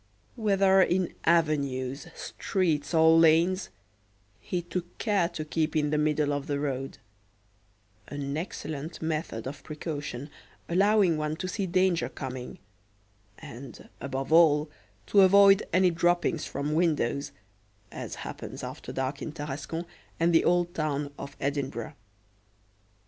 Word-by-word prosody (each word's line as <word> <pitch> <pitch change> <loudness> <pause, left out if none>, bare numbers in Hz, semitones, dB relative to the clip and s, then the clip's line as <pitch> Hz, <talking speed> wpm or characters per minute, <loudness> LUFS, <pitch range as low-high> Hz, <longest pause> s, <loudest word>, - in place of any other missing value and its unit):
Whether 195 -4 +4
in 180 0 +1
avenues, 140 -5 +1
streets, 160 -7 -1
or 160 -1 +6
lanes, 165 +4 +4 0.7
he 175 -1 -3
took 175 0 -5
care 200 -6 +1
to 160 -3 -5
keep 155 +1 -1
in 150 -1 +1
the 150 - +2
middle 150 -1 +1
of 145 0 -3
the 145 -1 -1
road 135 -2 -3 1.1
an 140 -1 -4
excellent 160 -1 -5
method 155 -8 -3
of 140 +2 -6
precaution, 145 -3 -5 0.4
allowing 195 -1 +3
one 155 0 -2
to 185 +3 -4
see 190 +1 -2
danger 185 -1 +2
coming, 130 -2 -7 0.8
and, 130 +3 -11
above 135 +2 -3
all, 150 -2 +5 0.3
to 200 - +5
avoid 195 +1 +6
any 185 -1 +4
droppings 175 -1 +1
from 145 +2 -3
windows, 150 -5 0 0.6
as - - -6
happens - - -7
after - - -7
dark 135 +1 -3
in - - -4
Tarascon 150 +2 -5 0.3
and 170 +1 +3
the 165 - +5
Old 175 0 +2
Town 145 -2 -2
of 140 0 -8
Edinburgh. 140 -4 -3
155 Hz, 125 wpm, -28 LUFS, 145-175 Hz, 1.1 s, or